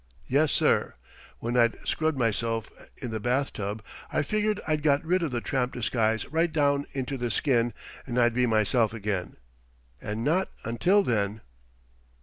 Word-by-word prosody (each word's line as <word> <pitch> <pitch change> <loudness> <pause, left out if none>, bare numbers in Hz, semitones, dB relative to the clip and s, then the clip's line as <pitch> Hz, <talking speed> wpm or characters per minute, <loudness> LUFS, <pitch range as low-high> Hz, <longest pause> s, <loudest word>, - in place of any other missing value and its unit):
Yes, 145 +3 +2
sir. - - +2 0.4
When 120 +1 -3
I'd 115 -1 +4
scrubbed 160 -2 0
myself 115 -2 -1 0.3
in 120 - -5
the 110 - -2
bathtub 110 -4 -1 0.3
I - - +1
figured 210 +5 0
I'd 155 -1 +1
got 145 0 +2
rid 180 +3 +2
of 165 - 0
the 120 -2 -2
tramp 130 -1 -1
disguise 110 -2 0
right 165 +1 +2
down 145 -2 +2
into 135 0 -3
the 120 0 -1
skin, 120 -1 +2 0.4
and 120 -1 -3
I'd 120 -1 +4
be 125 +1 +2
myself 110 +1 +2
again 100 -4 -3 0.6
and 105 +2 -3
not 175 +8 +1
until 180 - +3
then." 105 - 0
125 Hz, 155 wpm, -27 LUFS, 115-145 Hz, 0.6 s, I'd